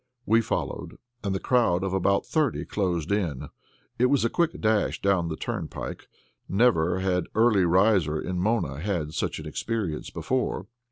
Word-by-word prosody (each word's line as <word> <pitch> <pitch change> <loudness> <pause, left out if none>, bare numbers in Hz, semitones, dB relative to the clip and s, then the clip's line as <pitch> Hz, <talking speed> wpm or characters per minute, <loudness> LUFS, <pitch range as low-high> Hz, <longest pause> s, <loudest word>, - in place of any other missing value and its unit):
We 115 +2 +4
followed, - - -4 0.3
and 100 -2 -1
the - - -1
crowd 95 -8 +2
of 95 -1 -2
about 100 +1 +2
thirty 155 -6 0
closed 90 -4 -1
in. 85 -10 -1 0.5
It 125 - +5
was 135 -3 +2
a 115 - 0
quick 170 -2 0
dash 110 -1 +1
down 95 -4 +2
that 80 -1 -5
turnpike. - - -5 0.4
Never 95 -5 +3
had 90 -2 0
early 110 -4 +4
riser 90 -4 +3
in 90 +2 -3
Mona 90 - 0
had 85 -4 -2
such - - -2
an - - -8
experience 105 -9 -3
before. 130 0 -2
95 Hz, 160 wpm, -26 LUFS, 85-115 Hz, 0.5 s, It